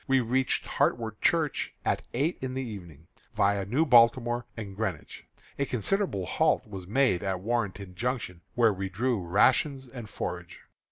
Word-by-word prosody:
We 135 0 +4
reached 130 +2 0
Hartwood 110 -3 -1
Church 160 -4 +1
at - - +1
eight 150 +7 0
in 130 -1 -4
the 130 - -2
evening, 85 - -9 0.3
viâ 100 -1 +2
New 135 +10 +2
Baltimore 120 -2 +4
and 100 -3 -6
Greenwich. 95 -7 -4 0.3
A 140 - +2
considerable 125 - 0
halt - - +1
was 95 -4 -8
made 115 -4 +2
at 95 -2 -2
Warrenton 100 -4 -2
Junction, 115 -4 -3
where 115 -3 +4
we 95 0 -4
drew 115 +3 0
rations 130 - +2
and 120 -4 -9
forage. - - -6
115 Hz, 155 wpm, -28 LUFS, 100-130 Hz, 0.3 s, We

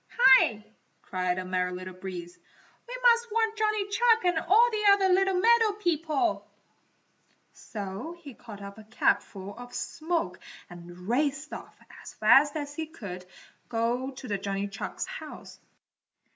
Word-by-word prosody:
"Hi!" 245 - +6 0.4
cried 180 -1 -2
the 185 - -4
Merry 180 0 -1
Little 185 +1 -7
Breeze, 180 -2 -8 0.5
"We - - -6
must 475 -1 +5
warn 450 0 +2
Johnny 430 -2 0
Chuck 455 +1 +3
and 350 -2 +2
all 450 +9 +4
the 425 -2 +4
other 385 -2 +3
little 385 0 +2
meadow 455 0 +4
people!" 330 -4 -1 1.0
So 210 - -7
he 290 -6 -11
caught 210 -4 -11
up 200 +2 -9
a - - -11
capful 205 -3 -1
of 245 0 -10
smoke 330 +1 -3 0.3
and 175 +1 -11
raced 280 +4 -1
off - - -9 0.3
as - - -11
fast 270 +7 +5
as 290 -2 -4
he 320 +1 -4
could 185 - -9 0.4
go 240 +3 -1
to 255 -6 -5
Johnny 200 0 -3
Chuck's 200 +2 -5
house. - - -10
270 Hz, 145 wpm, -28 LUFS, -, 1.0 s, Hi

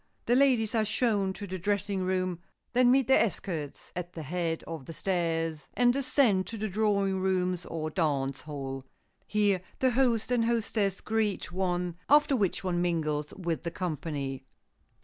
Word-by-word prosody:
The 240 - +3
ladies 250 -5 +3
are 225 -2 +3
shown 215 -3 +1
to 205 - -7
the 185 -1 -5
dressing 200 +1 -1
room, 185 -1 -1 0.3
then 250 0 +5
meet 265 +1 +5
their 265 - +6
escorts 165 -9 -4
at 180 0 -5
the 160 - -6
head 165 +1 -2
of 160 -5 -7
the 165 - -6
stairs 165 -4 -1
and 245 0 +4
descend 250 -8 +2
to 225 - -6
the 215 +1 -2
drawing 200 -2 +1
rooms 185 -2 0
or 155 -1 -3
dance 140 -5 0
hall. 135 -3 -5 0.4
Here 205 -3 +2 0.2
the 260 -1 +2
host 245 -2 +2
and 235 -2 +3
hostess 220 -4 0
greet 215 -4 -1
one, 180 -2 -1
after 295 -1 +5
which 200 -6 0
one 175 -2 0
mingles 155 -4 -1
with 170 -4 -2
the 170 - -3
company. 145 -6 -4
185 Hz, 165 wpm, -29 LUFS, 165-220 Hz, 0.4 s, their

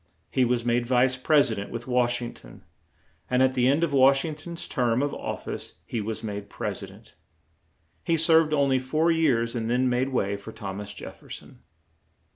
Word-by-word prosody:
He 130 - +3
was 120 -1 0
made 120 0 +1
Vice 125 +1 +3
Presi 135 -3 +3
dent 100 - -5
with 120 0 -6
Wash 125 -1 +1
ing 120 - -5
ton, - - -15 0.7
and 125 +1 +3
at 130 0 +3
the 125 -1 +2
end 145 +5 +3
of 160 -4 0
Wash 135 +1 +5
ing 160 - -3
ton's 170 +3 -8
term 120 +1 +1
of 145 - -1
of - - -5
fice - - -6
he 115 - -3
was 110 +2 -4
made 100 -1 -5
Pres - - -4
i - - -7
dent. - - -17 0.9
He 165 - +1
served 160 -1 +5
on 140 -2 +2
ly 130 -1 +3
four 155 +6 +1
years 130 -8 +1
and 115 -1 -2
then 125 +2 +2
made 125 +2 +1
way 100 -6 -1
for 100 +2 -10
Thom 100 -3 -6
as 100 - -8
Jef - - -10
fer - - -19
son. - - -10
125 Hz, 215 wpm, -26 LUFS, 115-140 Hz, 0.9 s, Wash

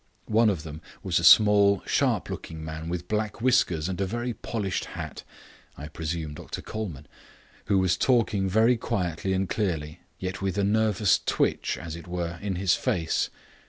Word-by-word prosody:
One 110 +1 +4
of 90 -7 -2
them 80 0 -8 0.2
was 90 -3 +1
a - - -4
small, 100 0 +6
sharp - - +1
looking 80 -1 -7
man 80 +1 -6
with 90 0 -4
black 105 0 -2
whiskers 110 -10 +2
and 95 0 -3
a - - +2
very 120 +4 -3
polished 105 -5 -3
hat - - -7 0.5
(I 75 +2 -7
presume 80 0 -4
Dr - - -7
Colman), 85 -11 -6 0.6
who 100 - +2
was 95 -1 +2
talking 105 -6 +2
very 110 +5 +4
quietly 95 -5 -2
and 95 0 0
clearly, 80 -8 -2 0.2
yet 95 +1 -5
with 95 -1 -1
a 100 - +2
nervous 105 -2 +3
twitch, - - 0
as 80 -1 -6
it 85 +1 -10
were, 85 -1 -4
in 100 -2 -2
his 95 0 +2
face. 80 -3 0
95 Hz, 170 wpm, -26 LUFS, 85-105 Hz, 0.6 s, small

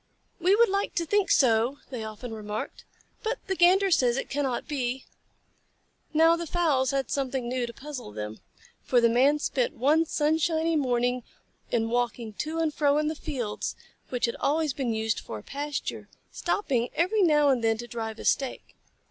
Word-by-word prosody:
"We 365 +3 +4
would 470 +2 +5
like 395 +1 -1
to 340 - 0
think 410 +2 +1
so," 240 +1 +3
they 240 -4 -4
often 220 +2 -7
remarked, 210 -1 -6 0.4
"but 460 +3 -1
the 380 - -1
Gander 370 +3 +5
says 250 -6 +3
it - - -4
cannot 270 -3 -1
be." 260 -3 -2 1.1
Now 325 +2 +5
the 335 0 -5
fowls 295 -7 +1
had 270 -2 -1
something 265 -3 -1
new 250 0 -1
to - - -6
puzzle 275 - -8
them, 105 +1 -6 0.4
for 250 - +3
the 235 -1 +4
Man 265 +6 +4
spent 260 -4 -1
one 305 +6 +3
sunshiny 320 +2 +1
morning 250 -3 +1 0.5
in 225 -2 +1
walking 235 -2 -1
to 315 +2 -2
and 320 -2 0
fro 290 -1 +2
in 305 0 +1
the 315 - -3
fields 250 -9 -4 0.3
which 250 -2 0
had 235 - -3
always 305 0 +1
been 255 -3 -2
used 220 0 -1
for 110 - -7
a 105 - -10
pasture, 290 +1 -4 0.2
stopping 250 - -1
every 375 +6 +2
now 300 -5 +4
and 255 -4 +2
then 225 -1 +2
to 240 - -6
drive 225 -2 -5
a - - -8
stake. 270 -2 -1
270 Hz, 180 wpm, -27 LUFS, 240-315 Hz, 1.1 s, would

